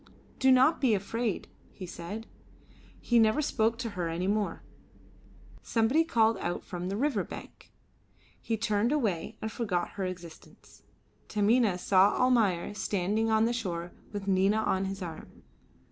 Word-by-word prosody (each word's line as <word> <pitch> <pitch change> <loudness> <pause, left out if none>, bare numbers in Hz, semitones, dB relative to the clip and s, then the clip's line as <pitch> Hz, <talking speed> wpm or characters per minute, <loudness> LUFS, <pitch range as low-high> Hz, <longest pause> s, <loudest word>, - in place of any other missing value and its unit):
"Do 265 0 +5
not 260 +5 +5
be 245 -6 +4
afraid," 215 +2 -2 0.2
he 185 - -9
said. 180 +6 -7 0.7
He 240 -1 +2
never 220 +4 +4
spoke 230 -6 +1
to 235 -2 -4
her 180 -4 -3
any 170 +2 -2
more. 205 +1 -1 1.0
Somebody 235 +8 +2
called 225 -8 +2
out 175 - -3
from 180 0 -5
the 200 - -2
river 250 -6 +1
bank; - - -11 0.7
he 225 - -2
turned 215 +1 +1
away 215 - -1
and 220 - -3
forgot 195 -7 -1
her 200 - -5
existence. 175 -3 -10 0.5
Taminah 215 -1 +2
saw 190 +2 +4
Almayer 220 -8 +2
standing 205 +2 -1
on 220 0 +3
the 235 - +1
shore 175 -7 -4 0.2
with 205 -2 -5
Nina 195 +2 +3
on 195 -3 0
his 195 0 -4
arm. 165 -3 -9
210 Hz, 145 wpm, -29 LUFS, 185-230 Hz, 1.0 s, Do